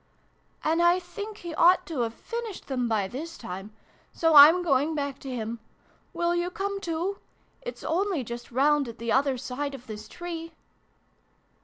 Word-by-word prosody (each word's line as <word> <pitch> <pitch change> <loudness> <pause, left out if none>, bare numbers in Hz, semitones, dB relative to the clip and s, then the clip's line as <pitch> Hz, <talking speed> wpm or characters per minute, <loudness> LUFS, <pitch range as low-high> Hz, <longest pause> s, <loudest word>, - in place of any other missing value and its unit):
" - - -37
and 325 +2 +2
I 345 +1 +5
think 410 +4 -7
he 345 -4 -7
ought 360 +3 +5
to 320 -6 -4
have 230 -1 -1
finished 465 -4 -6
them 250 -3 -1
by 210 -3 +1
this 300 +10 -7
time. 195 +3 -7 0.4
So 325 -1 +2
I'm 310 +5 +9
going 295 0 +2
back 280 -2 -3
to 270 - -8
him. 235 -2 -4 0.5
Will 345 0 0
you 345 +1 0
come 395 +2 -3
too? 355 +2 -2 0.4
It's - - -7
only 360 -3 0
just 240 +1 -7
round 285 +2 +3
at 230 0 -8
the 230 0 -3
other 270 -1 +2
side 275 +3 -4
of 250 -2 -12
this 215 -2 -8
tree." 330 +2 -7
300 Hz, 175 wpm, -27 LUFS, 250-350 Hz, 0.5 s, I'm